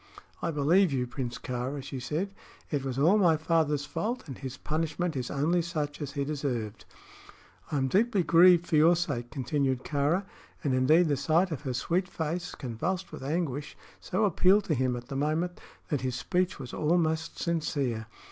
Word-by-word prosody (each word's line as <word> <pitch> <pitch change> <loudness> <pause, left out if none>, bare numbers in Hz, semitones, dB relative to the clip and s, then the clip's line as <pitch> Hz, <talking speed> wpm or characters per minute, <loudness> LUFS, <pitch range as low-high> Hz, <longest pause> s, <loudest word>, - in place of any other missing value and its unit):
"I - - -1
believe 165 +4 +3
you, 130 -2 0
Prince 120 -1 -4
Kāra," 130 +3 -4
she 135 -1 -6
said. 160 +10 -3 0.4
"It 145 -3 0
was 135 -2 -3
all 170 +10 +5
my 170 -5 +4
father's 155 -3 +1
fault, 240 +11 -3
and 135 - -6
his 130 0 -7
punishment 160 +3 -2
is 125 -2 -3
only 160 +5 +1
such 155 -3 -3
as 140 -1 -4
he 140 -2 -1
deserved." 125 -8 -3 0.9
"I 150 - 0
am 135 -1 +1
deeply 205 - +2
grieved 175 +1 +6
for 160 - +1
your 165 +3 +6
sake," 120 -8 -2
continued 135 -1 -1
Kāra, 150 +7 0 0.4
and 140 - +1
indeed 155 +7 +4
the 145 -2 +1
sight 170 +6 +2
of 155 - -3
her 135 -4 -3
sweet 175 +9 0
face, 170 0 -3
convulsed 160 +10 -3
with - - -8
anguish, 145 -1 -2 0.2
so 210 +4 0
appealed 195 +2 +4
to 170 - -1
him 130 -2 +1
at 120 0 -7
the 135 - -4
moment 155 +5 -1 0.3
that 145 -5 0
his 130 -2 -2
speech 185 +7 0
was 130 -3 -8
almost 160 0 0
sincere. 140 -9 -1
150 Hz, 180 wpm, -29 LUFS, 135-175 Hz, 0.9 s, grieved